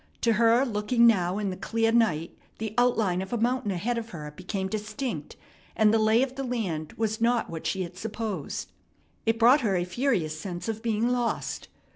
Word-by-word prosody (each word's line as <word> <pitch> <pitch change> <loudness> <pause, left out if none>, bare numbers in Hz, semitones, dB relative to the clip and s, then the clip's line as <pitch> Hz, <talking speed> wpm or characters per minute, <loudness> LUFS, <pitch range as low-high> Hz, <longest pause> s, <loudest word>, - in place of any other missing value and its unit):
To 230 - +3
her 230 +4 +4
looking 235 +1 +2
now 185 -5 +3
in 205 -2 -1
the - - -4
clear 225 +4 0
night 180 -9 +1 0.2
the 220 -1 -4
outline 220 -7 +2
of 190 - -6
a 240 - 0
mountain 240 -1 0
ahead 220 +6 -1
of 230 0 -8
her 150 -7 -8
became 190 +2 -3
distinct, 210 - -4 0.4
and 215 0 +4
the 225 - +4
lay 220 +3 +4
of 265 -1 -3
the 275 - -3
land 195 - -3
was 220 0 -2
not 235 -3 +2
what 165 -1 -4
she 190 -1 -1
had 175 0 -8
supposed. 220 -2 -4 0.6
It 225 0 +3
brought 245 +6 +6
her 205 -5 +1
a 175 - +1
furious 180 - -1
sense 175 +2 -5
of 220 -1 -3
being 230 0 +1
lost. 245 -2 -2
220 Hz, 195 wpm, -27 LUFS, 190-235 Hz, 0.6 s, brought